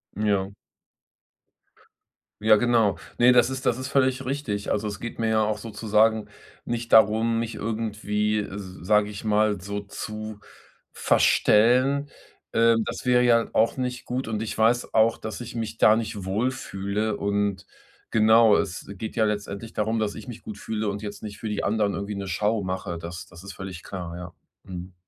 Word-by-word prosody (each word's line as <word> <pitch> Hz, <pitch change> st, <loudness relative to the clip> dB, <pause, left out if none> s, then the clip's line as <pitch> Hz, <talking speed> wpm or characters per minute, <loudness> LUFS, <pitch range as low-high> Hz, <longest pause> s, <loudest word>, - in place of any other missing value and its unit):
Ja. 100 Hz, -2 st, 0 dB, 1.9 s
Ja, 110 Hz, 0 st, +7 dB
genau. 115 Hz, -4 st, +2 dB, 0.2 s
Ne, 120 Hz, +1 st, +7 dB
das 120 Hz, +1 st, +4 dB
ist 130 Hz, 0 st, -3 dB
das 120 Hz, -, +2 dB
ist 130 Hz, +1 st, -5 dB
völlig 130 Hz, -1 st, +1 dB
richtig. 125 Hz, -7 st, -3 dB
Also, 105 Hz, +1 st, 0 dB
es 100 Hz, -1 st, -5 dB
geht 115 Hz, -, -7 dB
mir 115 Hz, -1 st, +1 dB
ja 110 Hz, -1 st, +3 dB
auch 105 Hz, 0 st, -1 dB
sozusagen 110 Hz, 0 st, +1 dB, 0.4 s
nicht 120 Hz, 0 st, -4 dB
darum, 110 Hz, +2 st, +5 dB
mich 115 Hz, -1 st, -2 dB
irgendwie, 105 Hz, -1 st, -1 dB
sage 105 Hz, +2 st, 0 dB
ich 100 Hz, -, -8 dB
mal 105 Hz, -2 st, +2 dB
so, 100 Hz, +2 st, -4 dB
zu 110 Hz, +1 st, -7 dB, 0.5 s
verstellen? 130 Hz, +6 st, +3 dB, 0.4 s
Ähm. 115 Hz, 0 st, +4 dB
Das -, -, -6 dB
wäre 125 Hz, -1 st, +4 dB
ja 115 Hz, -1 st, +4 dB
auch 115 Hz, +4 st, +2 dB
nicht 125 Hz, -1 st, -3 dB
gut. 125 Hz, +1 st, -3 dB
Und 110 Hz, -1 st, -2 dB
ich 110 Hz, -, -4 dB
weiß 115 Hz, +3 st, +2 dB
auch, 110 Hz, +1 st, +4 dB
dass 110 Hz, -, -6 dB
ich 120 Hz, -1 st, -7 dB
mich 115 Hz, -1 st, -4 dB
da 110 Hz, -, +6 dB
nicht 110 Hz, -4 st, -4 dB
wohlfühle. 105 Hz, -1 st, -2 dB
Und, 100 Hz, -1 st, -1 dB, 0.4 s
genau, 110 Hz, 0 st, +5 dB
es 90 Hz, -, -3 dB
geht 110 Hz, +3 st, -6 dB
ja 110 Hz, -, +3 dB
letztendlich 105 Hz, +1 st, -4 dB
darum, 110 Hz, +2 st, 0 dB
dass 105 Hz, -1 st, -1 dB
ich 110 Hz, -, -9 dB
mich 120 Hz, -3 st, -8 dB
gut 105 Hz, -, -8 dB
fühle 110 Hz, 0 st, -3 dB
und 100 Hz, +1 st, -5 dB
jetzt 105 Hz, -1 st, -7 dB
nicht 105 Hz, -1 st, -7 dB
für 110 Hz, -, -6 dB
die 105 Hz, -, -2 dB
anderen 105 Hz, -1 st, +1 dB
irgendwie 100 Hz, +1 st, -4 dB
'ne 100 Hz, -1 st, -5 dB
Schau 105 Hz, +4 st, 0 dB
mache. 95 Hz, -2 st, -4 dB
Das 85 Hz, +1 st, -8 dB
das 85 Hz, +1 st, -14 dB
ist 100 Hz, -, -8 dB
völlig 95 Hz, -2 st, -8 dB
klar, 90 Hz, -3 st, -6 dB
ja. 90 Hz, -1 st, -8 dB, 0.3 s
Mhm. 90 Hz, 0 st, -8 dB
110 Hz, 175 wpm, -25 LUFS, 100-115 Hz, 1.9 s, Ja